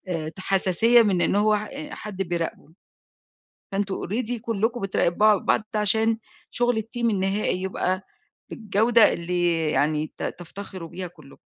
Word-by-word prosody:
آآ 155 -1 -4
ت 165 - -14
حساسية 195 +5 +4
من 190 -5 +1
إن - - +2
هو 210 +1 +3
ح 215 - -5
أ 295 +2 -7
حد 195 -2 -5
بيراقبه، 170 -2 -4 1.0
فأنتم 195 0 -1
already 235 +3 -2
كلّكم 230 +1 -1
بتراقبوا 195 +2 +3
بعض، - - +1
ده 215 - +1
عشان 220 +2 +3 0.3
شغل 245 -1 +1
الteam 225 +2 -11
النهائي 195 -1 0
يبقى 185 0 -2 0.5
بالجودة 220 +1 +3
اللي 170 -2 0
يعني 150 +3 0
ت - - -6
تفتخروا 180 0 -7
بيها 180 +1 -6
كلّكم. 155 -5 -17
195 Hz, 145 wpm, -24 LUFS, 175-220 Hz, 1.0 s, حساسية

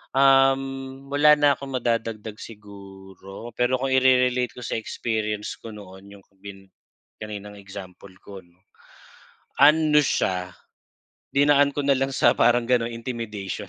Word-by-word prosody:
Um, 135 0 +2
wala 150 +1 +5
na 145 -1 +4
akong 135 -1 -7
madadagdag 115 -3 -3
siguro, 100 0 -12
pero 125 +2 0
kung 130 +1 -2
ire-relate 125 -2 +2
ko 125 - -8
sa - - -4
experience 110 -2 -4
ko 115 - -10
noon, 100 -1 -13
yung 95 - -20 0.2
bin 95 -1 -11 0.6
kaninang 105 -1 -8
example 95 -1 -11
ko 100 -1 -10
‘no, 85 0 -29 1.1
ano 150 0 +5
siya, 90 -8 -1 0.8
dinaan 145 0 +3
ko 145 0 -3
na 140 - +4
lang 135 +1 -1
sa 120 -2 +3
parang 120 +1 +3
gano’n, 120 -2 +1
intimidation. 115 -5 -6
115 Hz, 130 wpm, -23 LUFS, 100-135 Hz, 1.1 s, wala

